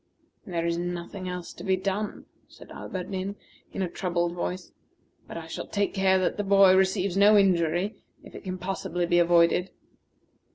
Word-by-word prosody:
"There 170 Hz, -3 st, -2 dB
is 170 Hz, 0 st, 0 dB
nothing 175 Hz, +2 st, -5 dB
else 180 Hz, -1 st, -6 dB
to -, -, -11 dB
be 190 Hz, -1 st, +2 dB
done," 200 Hz, +3 st, -3 dB, 0.2 s
said -, -, -15 dB
Alberdin 190 Hz, +1 st, -5 dB, 0.4 s
in 195 Hz, -, -2 dB
a -, -, 0 dB
troubled 175 Hz, -1 st, -1 dB
voice; 180 Hz, +1 st, -4 dB, 0.6 s
"but -, -, -7 dB
I 165 Hz, -, -7 dB
shall 160 Hz, -, -6 dB
take 200 Hz, 0 st, -1 dB
care 190 Hz, -1 st, +3 dB
that 185 Hz, -, 0 dB
the 205 Hz, -, -1 dB
boy 195 Hz, -1 st, +6 dB
receives 190 Hz, 0 st, +1 dB
no 205 Hz, +2 st, +6 dB
injury 180 Hz, 0 st, +2 dB, 0.3 s
if -, -, -14 dB
it -, -, -10 dB
can 185 Hz, -2 st, -4 dB
possibly 185 Hz, -1 st, -3 dB
be 175 Hz, 0 st, +3 dB
avoided." 175 Hz, +1 st, +4 dB
185 Hz, 170 wpm, -27 LUFS, 175-195 Hz, 0.6 s, boy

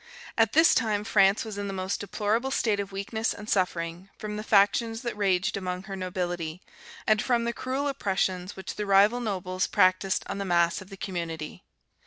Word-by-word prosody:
At 225 Hz, -1 st, +3 dB
this 325 Hz, +3 st, +6 dB
time 215 Hz, -4 st, +1 dB
France 200 Hz, -1 st, +3 dB
was 210 Hz, -2 st, -6 dB
in 200 Hz, -, -3 dB
the 195 Hz, -, -4 dB
most 185 Hz, 0 st, -2 dB
deplorable 215 Hz, +5 st, -1 dB
state 220 Hz, -6 st, +1 dB
of 200 Hz, 0 st, -4 dB
weakness 200 Hz, +3 st, -2 dB
and 210 Hz, 0 st, -9 dB
suffering, 180 Hz, -2 st, -1 dB
from 210 Hz, -1 st, -5 dB
the 210 Hz, -, -4 dB
factions 225 Hz, +3 st, +3 dB
that 235 Hz, -2 st, -3 dB
raged 195 Hz, -3 st, +1 dB
among 185 Hz, -1 st, -3 dB
her 195 Hz, 0 st, -6 dB
nobility, 175 Hz, -3 st, -3 dB, 0.5 s
and 215 Hz, 0 st, +3 dB
from 240 Hz, -2 st, +1 dB
the 235 Hz, 0 st, -1 dB
cruel 265 Hz, +4 st, -2 dB
oppressions 190 Hz, -7 st, -1 dB
which 190 Hz, -, -7 dB
the 210 Hz, -, -3 dB
rival 200 Hz, +5 st, +5 dB
nobles 185 Hz, -5 st, -2 dB
practised 185 Hz, +1 st, +2 dB
on -, -, -5 dB
the -, -, -1 dB
mass 170 Hz, -2 st, +2 dB
of 190 Hz, -, -12 dB
the 195 Hz, -, -10 dB
community. 170 Hz, -5 st, -5 dB
200 Hz, 190 wpm, -27 LUFS, 185-220 Hz, 0.5 s, this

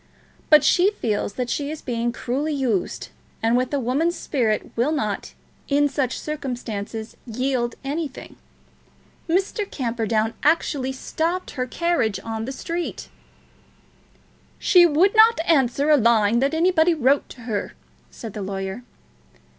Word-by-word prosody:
But 305 Hz, -2 st, +7 dB
she 365 Hz, +3 st, +4 dB
feels 215 Hz, -, -2 dB
that 250 Hz, +3 st, -3 dB
she 285 Hz, -1 st, -2 dB
is 310 Hz, 0 st, -7 dB
being 235 Hz, -1 st, -1 dB
cruelly 275 Hz, +6 st, -2 dB
used, 240 Hz, -9 st, -1 dB, 0.3 s
and 225 Hz, +1 st, +3 dB
with 255 Hz, 0 st, 0 dB
a 285 Hz, -, 0 dB
woman's 285 Hz, +8 st, 0 dB
spirit 230 Hz, -7 st, -1 dB
will 245 Hz, +6 st, +1 dB
not, 215 Hz, -10 st, -3 dB, 0.3 s
in 290 Hz, 0 st, +3 dB
such 270 Hz, -3 st, -2 dB
circumstances, 235 Hz, -7 st, -5 dB
yield 245 Hz, 0 st, -1 dB
anything. 285 Hz, 0 st, -5 dB, 0.9 s
Mr. 390 Hz, +4 st, 0 dB
Camperdown 230 Hz, -3 st, -1 dB
actually 290 Hz, -4 st, +1 dB
stopped 330 Hz, +7 st, -3 dB
her 255 Hz, -2 st, -3 dB
carriage 295 Hz, -, 0 dB
in 225 Hz, 0 st, -3 dB
the 265 Hz, -, -4 dB
street." 335 Hz, +5 st, -5 dB, 1.5 s
"She 350 Hz, -2 st, +6 dB
would 345 Hz, +7 st, +3 dB
not 445 Hz, -1 st, +6 dB
answer 280 Hz, -2 st, +2 dB
a 300 Hz, -, +7 dB
line 230 Hz, -2 st, +3 dB
that 275 Hz, +4 st, +1 dB
anybody 340 Hz, 0 st, +3 dB
wrote 275 Hz, -1 st, +2 dB
to 250 Hz, -, -12 dB
her," 220 Hz, -4 st, -3 dB, 0.4 s
said 225 Hz, -4 st, -9 dB
the 210 Hz, -, -5 dB
lawyer. 195 Hz, +2 st, -4 dB
265 Hz, 135 wpm, -23 LUFS, 230-315 Hz, 1.5 s, But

